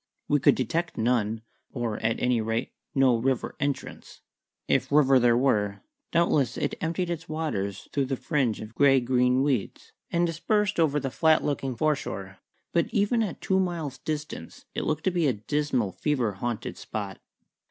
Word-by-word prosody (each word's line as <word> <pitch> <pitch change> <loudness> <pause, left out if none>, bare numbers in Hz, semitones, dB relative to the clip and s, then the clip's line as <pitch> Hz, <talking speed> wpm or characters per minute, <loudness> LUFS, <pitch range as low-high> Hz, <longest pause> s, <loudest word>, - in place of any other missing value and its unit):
We 145 - +3
could - - +5
detect 165 +7 -2
none, 115 -1 +1 0.3
or, 120 -4 -3
at 115 +1 0
any 125 -2 +2
rate, 115 +1 -2 0.2
no 130 -3 +4
river 130 +2 -1
entrance. 140 -1 -4 0.5
If - - +1
river 135 -3 +5
there 120 -1 +4
were, 105 -6 +1 0.3
doubtless 165 -6 +2
it - - -1
emptied 170 +2 -1
its 165 -1 -5
waters 100 -12 -3
through 140 -2 +1
the 135 +1 -1
fringe 130 -3 0
of 110 +1 -9
grey 135 +1 +5
green 125 +1 +2
weeds, 135 -8 -2 0.2
and 170 0 +2
dispersed 200 +4 0
over 150 -3 +3
the 135 -2 -3
flat 155 +7 +3
looking 135 -3 -2
foreshore; 105 -10 -2 0.3
but 170 -1 +2
even 210 +3 +2
at 205 -6 -3
two 190 0 +2
miles' 165 -8 -2
distance 150 - -5
it - - -2
looked 155 0 -1
to 190 - +2
be 170 -4 +1
a 130 - +2
dismal, 125 -1 -1
fever 130 - 0
haunted 115 +3 -4
spot. 100 -3 -5
135 Hz, 165 wpm, -27 LUFS, 115-155 Hz, 0.5 s, could